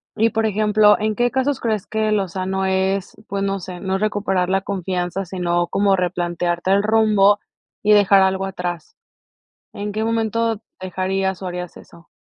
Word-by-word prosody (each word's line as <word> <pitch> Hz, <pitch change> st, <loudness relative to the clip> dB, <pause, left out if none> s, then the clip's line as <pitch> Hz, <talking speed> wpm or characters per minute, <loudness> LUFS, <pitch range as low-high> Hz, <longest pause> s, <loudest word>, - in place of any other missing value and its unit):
y, 225 Hz, +1 st, +3 dB
por 225 Hz, 0 st, 0 dB
ejemplo, 210 Hz, 0 st, +4 dB
¿en 215 Hz, 0 st, -1 dB
qué 240 Hz, +2 st, +1 dB
casos 265 Hz, +1 st, 0 dB
crees 215 Hz, -4 st, -1 dB
que 220 Hz, 0 st, 0 dB
lo 195 Hz, -3 st, 0 dB
sano 190 Hz, +1 st, -2 dB
es, 190 Hz, 0 st, -1 dB
pues, 200 Hz, 0 st, -2 dB
no 195 Hz, 0 st, -1 dB
sé, 180 Hz, 0 st, -8 dB
no 190 Hz, 0 st, -1 dB
recuperar 200 Hz, -3 st, 0 dB
la 195 Hz, 0 st, +1 dB
confianza, 185 Hz, -1 st, -3 dB
sino 175 Hz, -1 st, -1 dB
como 195 Hz, -1 st, +2 dB
replantearte 175 Hz, 0 st, -1 dB
el 200 Hz, +1 st, +4 dB
rumbo 210 Hz, -2 st, +4 dB, 0.4 s
y 210 Hz, -, +3 dB
dejar 200 Hz, -2 st, +6 dB
algo 190 Hz, 0 st, +1 dB
atrás? 175 Hz, -3 st, -5 dB, 0.8 s
¿En 205 Hz, +1 st, -4 dB
qué 215 Hz, +2 st, -2 dB
momento 225 Hz, -1 st, 0 dB, 0.2 s
dejarías 190 Hz, +1 st, -2 dB
o 185 Hz, -, -4 dB
harías 180 Hz, -1 st, -6 dB
eso? 170 Hz, -, -16 dB
195 Hz, 165 wpm, -20 LUFS, 185-215 Hz, 0.8 s, dejar